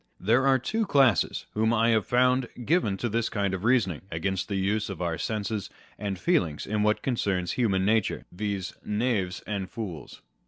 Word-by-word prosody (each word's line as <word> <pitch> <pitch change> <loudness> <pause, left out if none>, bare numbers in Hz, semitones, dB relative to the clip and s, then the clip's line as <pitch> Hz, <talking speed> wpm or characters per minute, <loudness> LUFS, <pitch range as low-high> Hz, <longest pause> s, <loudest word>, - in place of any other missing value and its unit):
There 120 +7 +3
are 135 -1 +5
two 215 - -1
classes 130 - +3
whom 110 +1 +2
I 115 +1 +3
have 110 -3 +2
found 125 +1 +3 0.2
given 145 - +2
to 120 - -2
this 115 +1 0
kind 100 -3 -1
of 95 0 -3
reasoning 110 - +2
against 95 +3 -2
the 100 - -3
use 105 +2 0
of 100 - -6
our 85 -2 -2
senses 105 -2 -2 0.3
and 100 -2 -3
feelings 95 - 0
in 105 0 -1
what 105 0 +1
concerns 95 -8 0
human 95 -6 +1
nature, 110 -1 +1
viz., 100 0 -3
knaves 105 -5 -1
and 100 -3 -3
fools. 95 - -7
105 Hz, 175 wpm, -27 LUFS, 95-120 Hz, 0.3 s, are